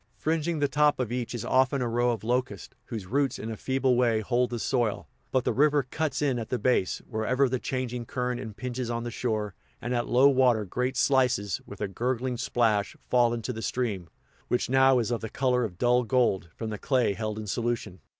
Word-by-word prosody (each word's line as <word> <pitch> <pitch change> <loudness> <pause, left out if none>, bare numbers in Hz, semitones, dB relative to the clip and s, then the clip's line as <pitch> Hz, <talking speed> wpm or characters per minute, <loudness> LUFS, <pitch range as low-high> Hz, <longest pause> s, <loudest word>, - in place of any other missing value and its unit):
Fringing 160 +1 -1
the 145 -1 +2
top 150 0 +2
of 120 -3 -2
each 125 -1 -3
is 115 - -4
often 130 +1 +2
a 125 - -1
row 120 +1 +1
of 115 -3 -2
locusts, 125 +3 -2
whose 110 -6 -6
roots 135 +5 0
in 115 - -5
a - - -4
feeble 130 +2 +1
way 120 -3 +3
hold 125 +2 +1
the 120 - -3
soil; 115 -2 -1 0.2
but 130 - +2
the - - 0
river 145 0 +3
cuts 150 +4 -2
in 135 -4 +1
at 115 - -6
the 125 - 0
base, 120 -7 +1
wherever 125 +4 +1
the 130 0 -1
changing 125 -2 -3
current 125 -1 -2
impinges 120 +3 -5
on 115 0 -2
the 120 - -4
shore, 110 -4 -2 0.3
and 120 - -3
at 120 -1 0
low 130 +3 +5
water 125 -6 +3
great 125 +6 -2
slices, 130 -7 +2
with 100 - -10
a 105 - 0
gurgling 125 +4 -2
splash, 115 -4 +1 0.2
fall 120 -2 +4
into 120 +2 -3
the 110 - -6
stream, 110 -9 -2 0.4
which 125 0 0
now 135 0 +5
is 120 -1 0
of 120 - -1
the 110 - -5
color 125 0 +1
of 95 -6 -4
dull 125 +3 +3
gold, 115 -8 +1
from 110 -1 -5
the 105 - -5
clay 125 -6 +1
held 110 +1 -4
in 110 - -5
solution. 115 -3 -2
125 Hz, 215 wpm, -27 LUFS, 110-130 Hz, 0.4 s, low